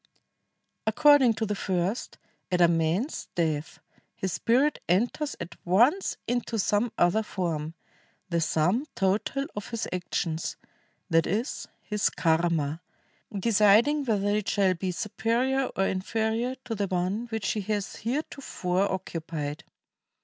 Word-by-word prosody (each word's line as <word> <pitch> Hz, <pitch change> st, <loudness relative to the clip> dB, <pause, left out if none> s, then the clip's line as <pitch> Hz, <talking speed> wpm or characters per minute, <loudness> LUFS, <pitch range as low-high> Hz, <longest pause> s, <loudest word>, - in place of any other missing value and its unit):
According 270 Hz, 0 st, +6 dB
to 220 Hz, -, -1 dB
the 210 Hz, -, -1 dB
first, 190 Hz, +2 st, -2 dB, 0.3 s
at 180 Hz, -, +2 dB
a 175 Hz, -, +7 dB
man's 170 Hz, -, 0 dB
death 160 Hz, -3 st, -1 dB, 0.4 s
his 190 Hz, -2 st, -3 dB
spirit 270 Hz, +6 st, +2 dB
enters 240 Hz, -, +1 dB
at 170 Hz, -, -7 dB
once 240 Hz, -, +3 dB
into 240 Hz, -1 st, -1 dB
some 210 Hz, +3 st, +1 dB
other 175 Hz, +5 st, +3 dB
form, 165 Hz, -6 st, -3 dB, 0.5 s
the 170 Hz, -2 st, 0 dB
sum 180 Hz, -, +1 dB
total 205 Hz, +8 st, 0 dB
of 205 Hz, -, -5 dB
his 230 Hz, -2 st, -3 dB
actions, 175 Hz, -2 st, -2 dB, 0.5 s
that 165 Hz, 0 st, +4 dB
is, 220 Hz, -, -2 dB, 0.2 s
his 210 Hz, -1 st, +1 dB
karma, 165 Hz, -2 st, +1 dB, 0.5 s
deciding 215 Hz, +7 st, +4 dB
whether 205 Hz, -4 st, +1 dB
it 210 Hz, 0 st, 0 dB
shall 195 Hz, -2 st, +3 dB
be 185 Hz, +1 st, -3 dB
superior 235 Hz, +8 st, 0 dB
or 195 Hz, -, +2 dB
inferior 220 Hz, +6 st, -1 dB
to 240 Hz, -, -3 dB
the 205 Hz, -2 st, -1 dB
one 185 Hz, +6 st, -1 dB
which 220 Hz, -4 st, -2 dB
he 215 Hz, -, -2 dB
has 205 Hz, 0 st, -3 dB
heretofore 220 Hz, -, -2 dB
oc 190 Hz, 0 st, -3 dB
cupied. 155 Hz, -2 st, -4 dB
200 Hz, 130 wpm, -27 LUFS, 175-230 Hz, 0.5 s, a